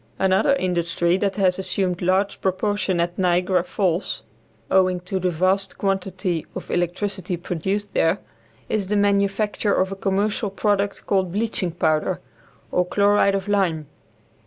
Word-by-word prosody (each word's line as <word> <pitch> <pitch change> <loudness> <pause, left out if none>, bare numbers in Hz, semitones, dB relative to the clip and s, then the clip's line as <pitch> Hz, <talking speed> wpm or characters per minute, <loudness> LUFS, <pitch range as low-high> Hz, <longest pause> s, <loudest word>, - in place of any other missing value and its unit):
Another 190 +8 +3
industry 175 -4 0
that 195 0 -1
has 190 -2 +2
assumed 185 -2 -1
large 190 +3 +1
proportions 190 -1 0
at 175 +2 -1
Niagara 180 0 +2
Falls, 180 -1 -1 0.5
owing 185 -1 +3
to 185 +2 -3
the 185 0 +1
vast 185 +3 0
quantity 190 -3 -1
of - - -6
electricity 180 +1 -1
produced 190 +4 -3
there, 165 - +2 0.5
is 205 -3 -1
the 210 - 0
manufacture 200 +1 +1
of 190 +1 +1
a - - -3
commercial 200 +2 0
product 200 0 -1
called 190 -3 +1
bleaching 210 -1 -1
powder, 165 +1 0 0.5
or 180 - +2
chloride 200 +1 +3
of 195 0 -3
lime. 185 -7 +1
190 Hz, 135 wpm, -23 LUFS, 180-200 Hz, 0.5 s, Another